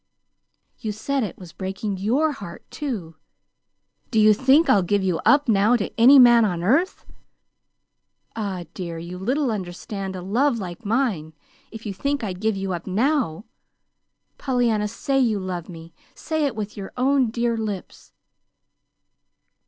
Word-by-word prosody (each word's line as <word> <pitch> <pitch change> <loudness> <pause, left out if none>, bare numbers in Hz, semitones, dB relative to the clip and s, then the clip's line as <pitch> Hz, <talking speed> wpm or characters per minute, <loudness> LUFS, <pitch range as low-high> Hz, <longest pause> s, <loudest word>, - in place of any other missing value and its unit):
"You 215 - -3
said 265 +6 -2
it 210 -6 -4
was 180 -3 -12
breaking 195 +1 -4
YOUR 255 +11 +1
heart, 175 -11 -9
too. 200 - -5 0.9
Do 220 - +1
you 215 0 +6
think 270 +8 +4
I'll 200 - +5
give 195 +2 0
you 180 -3 0
up 290 -1 +4
now 215 +2 +4
to 215 - -2
any 255 +5 +7
man 240 -2 +7
on 175 -5 -1
earth? 285 - +1 1.3
Ah, 200 -5 -3
dear, 170 -3 -5
you 175 +2 -7
little 260 +6 0
understand 195 0 -5
a 180 - -6
love 240 +7 +1
like 185 +1 -7
mine 210 - 0 0.4
if 225 0 -10
you 205 - -3
think 280 +6 -2
I'd 185 -3 -4
give 220 -2 0
you 195 -1 -3
up 175 +1 -6
now. 225 - 0 0.9
Pollyanna, 240 -5 +1
say 270 +5 -1
you 225 -6 +2
love 185 -2 -5
me 165 -1 -11 0.2
say 315 -2 -1
it 265 - -5
with 210 -1 -5
your 195 -2 -7
own 260 -1 +2
dear 235 +1 0
lips!" 210 -4 -6
215 Hz, 150 wpm, -23 LUFS, 190-250 Hz, 1.3 s, any